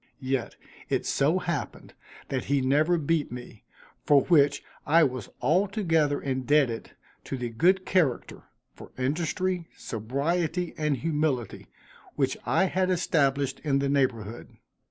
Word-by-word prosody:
Yet, 130 -2 -2 0.3
it - - 0
so 150 +6 +2
happened, 170 -7 -4 0.4
that 130 -2 -2
he 140 0 +1
never 150 +6 +3
beat 160 -2 0
me, 120 -3 -10 0.4
for 145 -2 +5
which, 145 -5 +3 0.2
I 165 +3 +5
was 130 -6 -2
altogether 165 - +2
indebted 130 -2 0 0.3
to 135 - -4
the 125 -1 -3
good 180 +11 +2
character, 160 -10 0 0.3
for - - -12
industry, 170 +6 -1
sobriety 160 - -2
and 150 -3 0
humility, 150 -4 -2 0.5
which - - 0
I - - +3
had 185 0 0
established 140 -6 +1
in 140 -3 0
the 140 0 0
neighborhood. 120 -6 -1
145 Hz, 125 wpm, -27 LUFS, 130-170 Hz, 0.5 s, for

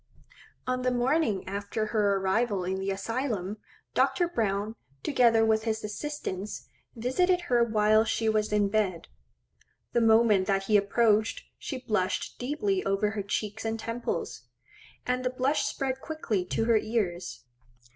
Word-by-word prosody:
On 255 0 -1
the 255 - +1
morning 245 -4 +1
after 200 +3 -3
her 205 -2 +3
arrival 195 +1 0
in 190 +1 -2
the 195 +1 -2
Asylum, 210 -1 -2 0.4
Dr. 350 - +2
Browne, 215 - -1 0.3
together 235 -5 +4
with 220 0 +3
his 220 -1 -1
assistants, 210 -3 -5 0.3
visited 350 +10 +1
her 245 -8 +2
whilst 215 0 +3
she 225 - 0
was 215 -1 +1
in 210 -1 +3
bed. 195 -5 -1 0.8
The 235 - +3
moment 220 -4 +4
that 195 -1 +1
he 210 +2 +1
approached, 215 +1 +2 0.2
she 270 - -4
blushed 190 -4 -1
deeply 345 +10 -1
over 200 +2 +1
her 215 -2 -3
cheeks 210 +2 -3
and 225 0 -2
temples; 230 +2 -3 0.6
and 250 0 0
the 255 - +1
blush 260 +4 0
spread 265 -1 -2
quickly 230 - -2
to 225 - -1
her 230 -1 +4
ears. 200 -6 -2
220 Hz, 145 wpm, -28 LUFS, 200-250 Hz, 0.8 s, together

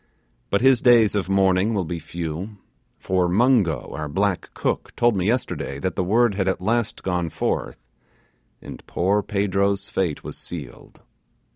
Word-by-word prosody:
But 100 - +1
his 130 -2 +5
days 120 -4 +5
of 100 -2 -1
mourning 95 +2 +2
will 95 -3 0
be 85 +1 -4
few 85 +5 -6 0.4
for 90 -2 0
Mungo, 100 - +2
our 75 -1 -4
black 95 +4 -1
cook, - - -2
told 120 -2 +3
me 95 0 0
yesterday 115 - -2
that 90 +6 -3
the 95 - 0
word 110 +4 +3
had 95 -1 -1
at 95 - 0
last 115 +3 -1
gone 90 -3 -1
forth, - - -2 0.9
and - - -10
poor 100 +4 +1
Pedro's 100 0 0
fate 85 -6 -2
was - - -7
sealed. 70 -9 -9
95 Hz, 155 wpm, -23 LUFS, 90-105 Hz, 0.9 s, his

